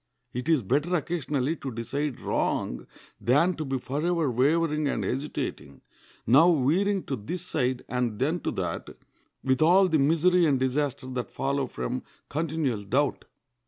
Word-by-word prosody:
It 125 +6 -3
is 155 -7 +3
better 145 - +1
occasionally 155 -3 -1
to 135 - -5
decide 130 +4 -3
wrong - - -1 0.3
than 145 +9 +3
to 155 - -4
be 135 -2 -2
forever 150 +3 -1
wavering 150 +4 +2
and - - -1
hesitating, 125 - -4 0.4
now 150 +10 +6
veering 175 +7 +2
to 135 - -3
this 130 - -5
side 125 -3 -1
and 125 -3 -1
then 155 +9 0
to - - -2
that, - - -3 0.5
with 130 +1 +1
all 185 +4 +6
the 160 -3 +2
misery 165 +4 +4
and 135 -3 +2
disaster 135 +1 -1
that 125 -1 -4
follow 140 0 -1
from 125 +1 -4 0.3
continual 150 -7 -1
doubt. 130 +9 0
140 Hz, 150 wpm, -27 LUFS, 130-160 Hz, 0.5 s, now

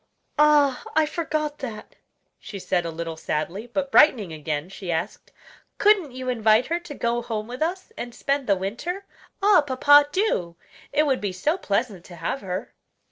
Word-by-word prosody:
"Ah! 295 -3 +4
I 315 0 +4
forgot 305 -2 -3
that," 225 -5 -7 0.4
she 200 - -8
said 180 -2 -1
a - - -2
little 165 0 -5
sadly; 170 +8 -3
but 275 +3 -3
brightening 215 - +5
again, 155 0 -3
she 190 -1 -6
asked: 160 +1 -4 0.5
"Couldn't 405 -8 +3
you 255 0 -7
invite 225 -1 +3
her 335 +2 -1
to 335 -4 -10
go 235 -1 -1
home 225 -3 -4
with 250 +3 -8
us 370 +6 -2
and 240 0 -7
spend 275 -1 -1
the 200 - +4
winter? 235 - -4 0.4
Ah! 405 -4 +6
papa, 290 +1 +5
do! 240 - 0 0.4
it 300 +2 +3
would 270 -3 +1
be 205 -2 -2
so 240 - 0
pleasant 210 - -2
to 175 - -11
have 170 +11 -3
her." 185 0 -5
245 Hz, 175 wpm, -24 LUFS, 190-300 Hz, 0.5 s, Ah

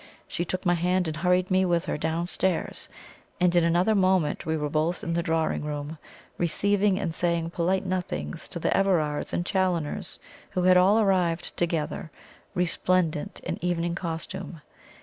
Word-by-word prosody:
She 175 - -2
took 185 +3 -4
my 175 - +4
hand 180 +1 +1
and 155 - -3
hurried 180 +2 +2
me 185 0 +4
with 175 -2 +1
her - - -2
downstairs, 170 +3 -1 0.5
and 180 0 +3
in 175 - +5
another 175 +6 +3
moment 185 -5 +2
we 160 0 +1
were 150 -1 -1
both 155 +4 0
in 170 - -2
the 170 - +1
drawing 160 -3 0
room, 150 +1 -5 0.4
receiving 200 +3 +2
and 175 -5 -2
saying 170 -1 -1
polite 185 +3 0
nothings 175 - -3
to - - -6
the - - 0
Everards 165 -7 +1
and 175 - -1
Challoners, 180 -6 -1 0.3
who 180 - -1
had 185 0 +6
all 190 +4 +5
arrived 180 -5 +1
together, 165 -2 -2 0.5
resplendent 180 -2 0
in - - -5
evening 175 -1 0
costume. 165 -1 -5
175 Hz, 160 wpm, -26 LUFS, 165-185 Hz, 0.5 s, had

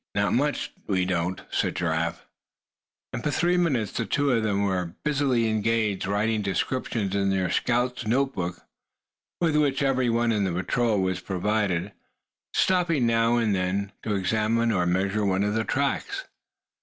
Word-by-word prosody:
"Not 100 0 +1
much 145 +3 0 0.2
we 95 -3 +1
don't," 90 0 -1
said - - 0
Giraffe. 85 -1 -1 0.9
And 120 - -4
for - - 0
three 175 +4 +2
minutes 140 - +1
the - - -2
two 140 -1 +1
of 115 -2 +2
them 100 -2 0
were 90 -4 -1
busily 135 -6 +2
engaged 110 -3 0
writing 105 +2 +1
descriptions 100 0 -1
in 100 -1 +1
their 95 -2 0
scout's 125 +1 0
note 135 +4 +1
book, 90 -1 -4 0.8
with 165 -3 +2
which 145 -2 +2
every 130 -2 +2
one 115 0 +2
in 105 -2 +1
the 95 - 0
patrol 105 +5 0
was 95 -1 -1
provided; 95 0 -1 0.6
stopping 170 -8 +2
now 115 0 +3
and 115 -3 +2
then 95 +2 -1
to 105 -2 -1
examine 110 +4 +1
or 90 -4 +1
measure 95 +4 +1
one 95 0 +1
of 105 0 0
the 110 0 0
tracks. 380 - -1
110 Hz, 160 wpm, -26 LUFS, 95-125 Hz, 0.9 s, now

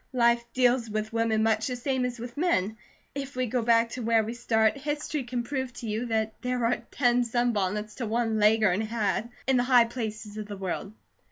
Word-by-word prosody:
"Life 235 -1 +3
deals 245 -2 +2
with 215 +1 -3
women 225 -1 +1
much 220 0 +2
the 250 - -2
same 255 +1 -1
as 250 -1 -3
with 240 +1 -8
men. 225 - +1 0.4
If 280 -1 -5
we 255 0 0
go 245 +1 -1
back 230 0 +3
to 250 - -6
where 225 -1 +3
we 225 +2 -4
start, 220 -2 +2
history 295 0 -3
can 240 0 -2
prove 260 0 -3
to 245 -1 -7
you 220 +3 -2
that 220 -1 -2
there 250 -1 -1
are 235 +1 +2
ten 245 -2 +2
sunbonnets 215 -3 0
to 240 - -3
one 225 0 0
Leghorn 210 -2 +4
hat, 220 -1 -1 0.2
in 265 -1 +3
the 245 - +3
high 250 -2 +5
places 220 -3 -5
of 215 -1 -5
the 205 -1 -7
world." 190 +1 -4
235 Hz, 205 wpm, -27 LUFS, 220-250 Hz, 0.4 s, high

